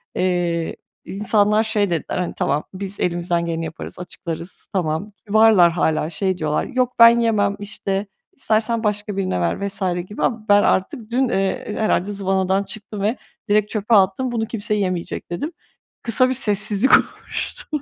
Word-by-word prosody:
eee, 175 -2 0 0.3
insanlar 210 +2 +2
şey 210 -3 0
dediler, 170 -2 -2
hani, 180 -1 -2
"Tamam, 145 +2 0
biz 195 +1 -5
elimizden 175 -1 0
geleni 165 -1 -2
yaparız, 160 +2 -8
açıklarız, 170 0 -7
tamam." 170 +2 -1 0.2
Kibarlar 210 -5 +6
hâlâ 160 -2 0
şey 185 0 -1
diyorlar, 150 -2 -1
"Yok, 250 0 -1
ben 230 0 +8
yemem, 210 -3 +2
işte, 200 -1 -3 0.3
istersen 225 +1 0
başka 210 -1 -2
birine 185 - -1
ver." 85 - -1
vs. 200 +1 -7 0.3
gibi 210 - -5
ama 225 -3 -1
ben 205 0 +6
artık 215 +4 0
dün, 255 +1 +2
eee, 195 0 -1
herhâlde 205 -2 +1
zıvanadan 190 -1 0
çıktım 210 -1 -7
ve 215 +5 0 0.3
direkt 210 0 +3
çöpe 220 +1 +1
attım 200 +6 +3
"Bunu 225 -2 -1
kimse 215 -2 -3
yemeyecek." 185 -4 -3
dedim. 290 - -3 0.5
Kısa 255 +2 +3
bir - - +1
sessizlik 210 0 +1
oluştu. - - -5
200 Hz, 155 wpm, -21 LUFS, 180-220 Hz, 0.5 s, ben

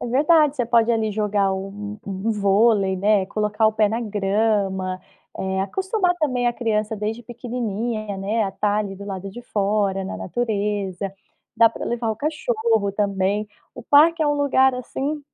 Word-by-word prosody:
É - - -4
verdade, 295 +4 +4
você 250 -5 0
pode 230 0 +3
ali 220 -1 0
jogar 205 -2 +1
um 205 +2 -6
um 195 +3 -2
vôlei, 200 -1 +3
né, 200 0 +2
colocar 210 +2 0
o 215 - +3
pé 215 -1 +2
na 225 +3 -2
grama, 200 -3 0 0.4
eh, 190 0 -2
acostumar 375 - 0
também 255 -5 +1
a 240 - +2
criança 220 -2 -1
desde 215 +3 -3
pequenininha, 230 -3 -4
né, 210 +3 0
a 195 - -4
tá 205 +1 0
ali 200 -2 -3
do 200 +1 -9
lado 195 -1 -5
de 240 +5 -10
fora, 200 -3 0
na 190 - -5
natureza. 205 -3 -2 0.4
Dá 230 - +7
para 225 - -7
levar 235 -1 -1
o - - -9
cachorro 230 -7 0
também. 200 +1 0 0.3
O - - -9
parque 315 +6 +5
é - - +2
um 290 - +2
lugar 265 -2 +3
assim, 275 +4 -4
215 Hz, 170 wpm, -22 LUFS, 200-240 Hz, 0.4 s, Dá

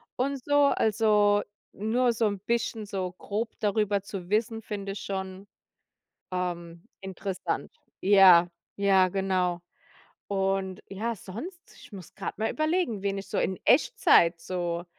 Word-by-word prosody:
und 270 0 -2
so, 290 0 +4
also 210 -4 +3 0.3
nur 235 +4 +1
so 225 0 0
'n 200 -1 -3
bisschen 225 +1 -2
so 185 -2 -3
grob 215 +5 -4
darüber 205 -1 +1
zu 190 -2 -8
wissen, 225 +1 0
finde 200 -2 -5
ich 205 - -7
schon, 190 0 -5 0.8
ähm, 170 -2 -4 0.2
interessant. 190 0 -4 0.3
Ja, 185 -3 +7 0.3
ja, 195 -2 +4
genau. 185 -2 0 0.7
Und 195 -1 -1
ja, 225 +4 -3
sonst 295 - -9
ich - - -16
muss 185 -4 -11
grad - - -5
mal 220 - 0
überlegen, 310 - 0
wen 200 0 -1
ich 195 0 -8
so - - -2
in 190 - -1
Echtzeit 260 - +4
so 175 -1 -3
200 Hz, 135 wpm, -27 LUFS, 185-225 Hz, 0.8 s, Ja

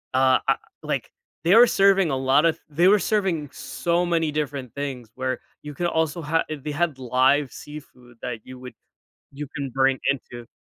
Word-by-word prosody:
uh 130 0 +4
I - - +4 0.3
like, - - -3 0.3
they 175 +6 +5
were 245 - +8
serving 195 -3 +4
a 135 - 0
lotta 140 +5 +3
th - - -29
they 170 +5 +3
were 205 +1 +6
serving 185 -9 0
so 175 +1 -1
many 165 -3 +1
different 140 -4 -3
things 130 -5 -5
where 130 -1 -1 0.2
you 150 0 -8
could 175 +4 -1
also 160 +1 0
ha 165 +2 +1
eh, 155 - -3
they 150 - -3
had 160 -1 0
live 130 +2 +2
seafood 125 -5 -12
that 120 -2 -4
you 130 - -9
would 125 - -9 0.6
you 150 +1 -5
can 140 -1 -2
bring 135 0 +3
into 120 -3 -6
145 Hz, 185 wpm, -24 LUFS, 130-165 Hz, 0.6 s, were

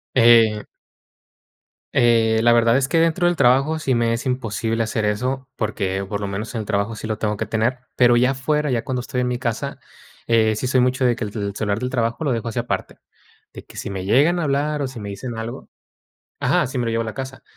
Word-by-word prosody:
Eh 115 -3 +5 1.3
eh, 115 -2 +3
la 120 - +5
verdad 115 +1 +4
es 135 -1 +1
que 165 +3 +2
dentro 165 +2 +2
del 175 - +2
trabajo 135 +4 +3
sí 135 -4 0
me 115 0 +1
es 115 - -4
imposible 115 -3 -1
hacer 110 -1 -2
eso, 125 +6 -2
porque 100 -4 -2
por 100 +1 -3
lo 100 - -2
menos 100 +3 -5
en - - -1
el - - -7
trabajo 100 +3 -1
sí 110 - -6
lo 110 -1 -2
tengo 105 -1 -2
que - - -2
tener, 115 +3 0 0.2
pero 120 -1 +5
ya 125 +2 +3
afuera, 150 +2 -1
ya 120 -2 0
cuando 130 -1 -3
estoy 125 +1 -3
en 125 - 0
mi 125 0 -1
casa, 115 -3 -3 0.5
eh, 110 -2 +3
sí 125 - -2
soy 130 0 +3
mucho 125 +1 +1
de 120 -1 +3
que 120 - -5
el 105 - -4
tel 100 -2 -4
celular 105 0 -1
del 125 +1 -2
trabajo 115 +3 -1
lo 145 - 0
dejo 115 -1 -2
así 120 - -3
aparte, 120 - -3 0.6
de - - -10
que - - -15
si - - -5
me 95 -2 -4
llegan 145 - +3
a - - -1
hablar, 145 +1 0
o, 140 - -1
si 130 -2 -9
me 100 -1 -6
dicen 115 +4 -6
algo 115 +1 -7 0.7
Ajá, - - +2
sí 130 - -5
me 120 - 0
lo 115 - -1
llevo 115 0 0
a - - -3
la 110 - -6
casa. 130 -1 -6
120 Hz, 245 wpm, -21 LUFS, 110-130 Hz, 1.3 s, Eh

